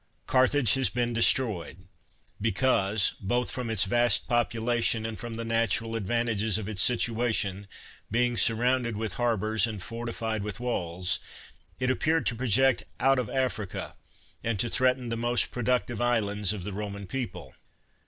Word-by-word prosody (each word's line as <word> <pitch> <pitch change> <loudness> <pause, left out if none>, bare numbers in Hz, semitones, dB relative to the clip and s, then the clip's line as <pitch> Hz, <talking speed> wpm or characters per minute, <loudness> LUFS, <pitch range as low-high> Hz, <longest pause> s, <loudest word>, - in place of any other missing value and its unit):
Carthage 130 -3 +3
has 135 -1 +2
been 120 0 -1
destroyed, 105 -7 +1 0.5
because, 105 -2 +2
both 120 +5 0
from 125 -2 -4
its 110 -3 +3
vast 120 +1 +2
population, 120 -1 0
and 110 -1 -5
from 120 -1 -6
the 115 0 -5
natural 115 0 0
advantages 110 -1 0
of 105 -2 -5
its 105 -3 0
situation, 115 -4 +1 0.4
being 120 +2 +1
surrounded 120 0 +1
with 110 -3 -3
harbors, 110 -2 +1
and 105 -4 -6
fortified 115 -1 -4
with 105 +2 -5
walls, 90 -7 0 0.6
it 130 0 +1
ap 130 - -2
peared 160 +1 +1
to 120 - 0
project 130 +2 +2 0.2
out 135 0 +3
of 120 -5 -3
Africa, 120 -7 -3 0.5
and 115 -3 -1
to 120 - +1
threaten 125 -1 +1
the 115 - -2
most 120 +1 +1
productive 125 -1 -1
islands 105 -5 +1
of 105 -4 -4
the 100 +1 -5
Roman 100 0 -5
people. 125 +5 -6
115 Hz, 150 wpm, -27 LUFS, 105-120 Hz, 0.6 s, Carthage